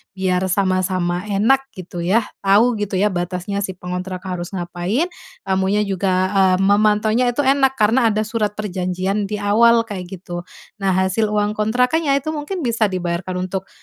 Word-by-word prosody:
biar 185 -1 0
sama-sama 185 -1 0
enak 240 +7 +2
gitu 180 -2 -8
ya, 210 +7 +2 0.2
tahu 210 +5 +4
gitu 205 -1 -2
ya 205 +3 +2
batasnya 180 +2 -3
si 190 -2 -3
pengontrak 180 +1 -5
harus 180 -2 -4
ngapain, 175 - -1 0.4
kamunya 190 +2 +1
juga, 195 -1 -1 0.4
eee, - - -1
memantaunya 215 +4 +3
itu 290 +4 -1
enak, 270 0 +3
karena 230 +2 +3
ada 215 -1 +1
surat 215 -1 -2
perjanjian 190 0 -2
di 210 - -3
awal, 230 +3 +4
kayak 200 -5 -7
gitu. 175 -1 -7 0.3
Nah 195 -2 +1
hasil 190 +4 +1
uang 210 0 0
kontrakannya 250 +8 +1
itu 310 +3 -4
mungkin 315 +4 -4
bisa 230 -3 +1
dibayarkan 180 0 -3
untuk, 190 +1 -4
200 Hz, 155 wpm, -20 LUFS, 185-220 Hz, 0.4 s, tahu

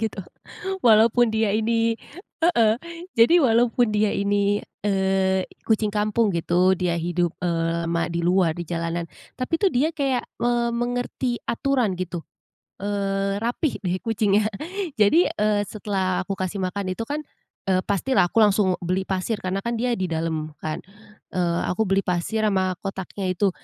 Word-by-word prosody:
gitu. 210 -4 -3 0.6
Walaupun 230 +1 +5
dia 220 -2 +1
ini 230 +1 +1 0.5
heeh, 230 -11 +4 0.4
jadi 240 +10 +6
walaupun 240 -1 +3
dia 210 0 +2
ini, 200 0 +1 0.2
eee, 190 -1 +1
i - - -21
kucing 220 -1 +2
kampung 215 +1 +1
gitu, 180 +3 +3
dia 175 -1 0
hidup, 175 0 0
eee, 170 -1 0
lama 170 0 0
di 170 - -2
luar 175 0 +3
di 175 - -5
jalanan. 170 0 -2 0.3
Tapi 255 +6 0
tuh 390 +1 +2
dia 275 +6 +2
kayak 270 -4 0 0.2
me 240 0 +2
mengerti 245 +1 -2
aturan 245 -5 +1
gitu, 180 -1 -4 0.6
eee, 195 -1 -1
rapi 245 +6 -1
deh 180 -2 -1
kucingnya. 215 -2 +2 0.5
Jadi, 310 - +5
eee, 210 -1 +1
setelah 190 -3 -1
aku 195 - -2
kasih 185 +2 -3
makan 185 0 -2
itu 230 - -6
kan, 300 +1 -3 0.4
eee, 185 -1 +2
pastilah 200 -1 +1
aku - - -5
langsung 200 -3 +3
beli 185 +2 0
pasir, 195 +3 -1
karena 185 +1 -2
kan 235 - -1
dia 245 -1 0
di 190 - -1
dalam 160 -2 -2
kan, 155 0 -3 0.6
eee, 175 -2 0
aku 180 +5 -1
beli 195 0 +2
pasir 185 +5 0
sama 190 -3 +1
kotaknya 195 0 -5
itu, 195 +2 +2
200 Hz, 155 wpm, -24 LUFS, 185-230 Hz, 0.6 s, jadi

